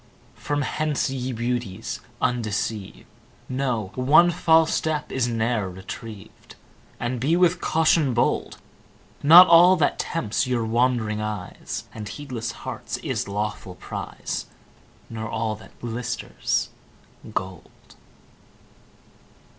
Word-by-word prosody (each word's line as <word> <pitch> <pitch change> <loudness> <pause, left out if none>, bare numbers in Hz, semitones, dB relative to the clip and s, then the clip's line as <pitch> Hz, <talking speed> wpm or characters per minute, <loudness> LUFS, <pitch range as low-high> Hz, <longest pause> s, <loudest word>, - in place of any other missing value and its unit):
From 145 0 -2
hence, 150 -1 -1
ye 130 -1 -3
Beauties 120 -4 -3 0.2
undeceived, 110 -3 -2 0.4
Know, 125 -7 -2
one 150 +7 +5
false 160 -1 +4
step 155 -1 -1
is 130 -2 0
ne'er 115 -3 0
retrieved, 95 +3 -10 0.4
And 120 +1 -2
be 150 +7 +2
with 180 0 +3
caution 155 -5 +2
bold. 120 - 0 0.6
Not 170 +5 +10
all 175 +2 +7
that 155 -5 +1
tempts 120 -7 -1
your 120 -3 0
wand'ring 115 -2 +1
eyes 105 -4 -5
And 105 -2 -7
heedless 120 -1 -5
hearts, - - -4
is - - -2
lawful 105 -2 -4
prize; - - -5 0.6
Nor 110 -1 -5
all 110 -1 -1
that 110 - -17
glisters, 120 +1 -2 0.6
gold. 95 -4 -7
120 Hz, 105 wpm, -24 LUFS, 110-145 Hz, 0.6 s, Not